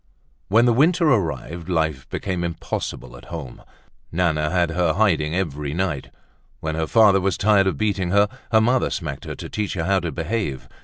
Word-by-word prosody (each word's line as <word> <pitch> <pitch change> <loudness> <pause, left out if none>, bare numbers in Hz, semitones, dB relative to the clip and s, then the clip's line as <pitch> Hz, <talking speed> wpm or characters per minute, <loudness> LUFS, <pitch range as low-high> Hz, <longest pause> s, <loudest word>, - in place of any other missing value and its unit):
When 115 +5 +4
the 120 - +4
winter 165 +7 +3
arrived, 85 - -1
life 80 -6 -1
became 90 -3 -3
impossible 80 -6 -4
at - - -13
home. 80 -7 -8 0.5
Nana 80 -3 +1
had 85 -1 +1
her 85 -1 +1
hiding 85 -5 +1
every 75 -5 -2
night. 85 -6 -2 0.5
When 80 0 -3
her 80 0 -1
father 105 -2 +5
was 95 -1 0
tired 100 -2 +4
of 90 -7 0
beating 100 -3 0
her, 100 +2 +4 0.2
her 110 -1 +5
mother 125 +3 +2
smacked 75 -6 -5
her - - -5
to - - -7
teach 105 -2 -3
her 85 - -1
how 95 0 +2
to 85 -3 -4
behave. 85 - -3
90 Hz, 185 wpm, -22 LUFS, 80-100 Hz, 0.5 s, father